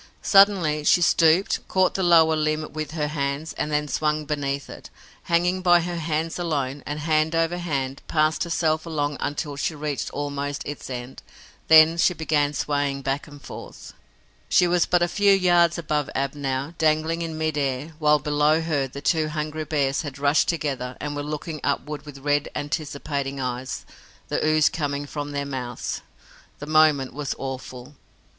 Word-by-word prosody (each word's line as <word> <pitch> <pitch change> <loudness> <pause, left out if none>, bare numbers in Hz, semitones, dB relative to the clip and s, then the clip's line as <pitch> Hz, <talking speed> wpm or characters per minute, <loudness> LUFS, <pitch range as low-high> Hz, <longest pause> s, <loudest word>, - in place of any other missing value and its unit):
Suddenly 190 -7 +4
she 175 - +5
stooped, 170 +2 +3
caught 185 -1 +2
the 195 - -2
lower 165 -3 +5
limb 155 0 -1
with 155 -1 -4
her 150 -2 -1
hands 140 +1 -3
and 150 - -3
then 150 0 0
swung 150 +1 -1
beneath 140 -2 -2
it, - - -11 0.4
hanging 175 +2 +1
by 175 -1 +5
her 175 0 -4
hands 160 +1 -2
alone, 145 -5 -2
and, 150 +1 -4
hand 155 +1 +1
over 165 +2 +1
hand, 140 -6 -3
passed 155 0 +1
herself 160 -1 0
along 145 -3 -2
until 145 0 -3
she 155 +3 -2
reached 150 -1 -3
almost 145 0 -4
its 145 -1 -7
end. 125 0 -7 0.5
Then 160 +1 +7
she 180 - +3
began 150 -3 +1
swaying 140 0 -1
back 135 +3 -2
and 145 -1 -12
forth. - - -10 0.6
She 180 - +5
was 175 -1 +2
but 175 -1 +3
a - - +2
few 200 +3 +3
yards 175 -3 +4
above 150 -3 -1
Ab 135 0 -1
now, 140 +1 -3
dangling 160 +1 +1
in 165 -1 -4
mid 155 -1 -1
air, 140 +2 -2
while, 150 -1 +4
below 150 +2 +2
her, 155 -5 -1
the 140 +2 -9
two 160 0 +1
hungry 155 0 -4
bears 140 -3 0
had 145 -4 -7
rushed 145 +2 +2
together 135 -6 -2
and 145 0 -4
were 145 - -3
looking 150 +1 -5
upward 150 0 -2
with 145 -2 -9
red, 145 0 +1
anticipating 145 -2 -3
eyes, 125 0 -4 0.4
the - - -1
ooze 155 0 +4
coming 145 -2 -2
from 145 0 -5
their 140 0 -2
mouths. 125 -4 -4 0.6
The 145 - -7
moment 155 -3 +3
was 145 -1 -3
awful. 130 0 -7
150 Hz, 170 wpm, -24 LUFS, 140-160 Hz, 0.6 s, Then